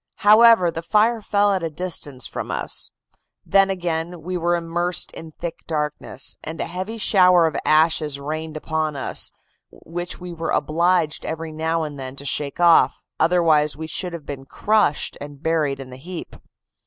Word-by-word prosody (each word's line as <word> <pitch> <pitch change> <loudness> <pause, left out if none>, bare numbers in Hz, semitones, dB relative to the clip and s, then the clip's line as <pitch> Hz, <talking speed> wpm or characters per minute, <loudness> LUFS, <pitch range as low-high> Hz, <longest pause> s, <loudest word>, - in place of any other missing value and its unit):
However, 215 -4 +7
the 165 - -4
fire 220 +5 +2
fell 205 0 +2
at 165 -5 -2
distance 145 -7 -2
from - - -5
us; - - -2 0.6
then 195 0 +4
again 175 -2 -3
we 185 +2 -4
were 175 0 +1
immersed 175 +1 -2
in 160 -1 -10
thick 170 +1 -6
darkness, 150 -4 -3
and 160 +1 -6
a - - -1
heavy 185 +6 -5
shower 180 -5 +5
of 160 - -1
ashes 155 -2 +3
rained 155 +2 -5
upon 155 -1 -2
us, 135 - 0 0.4
which 175 +1 -7
we 180 -1 -7
were 165 0 -4
obliged 165 +1 +1
every 160 0 -4
now 160 +1 -1
and 145 -2 -6
then 130 0 -6
to 140 - -10
shake 140 +1 -1
off, 170 -1 +5 0.2
otherwise 160 -4 +3
we 160 - -5
should 170 +2 -4
have 165 -4 -7
been 135 -2 -7
crushed 210 -1 +1
and 145 0 -9
buried 155 -4 0
in 130 -1 -9
the 125 - -9
heap. 170 +5 -8
165 Hz, 165 wpm, -22 LUFS, 150-180 Hz, 0.6 s, However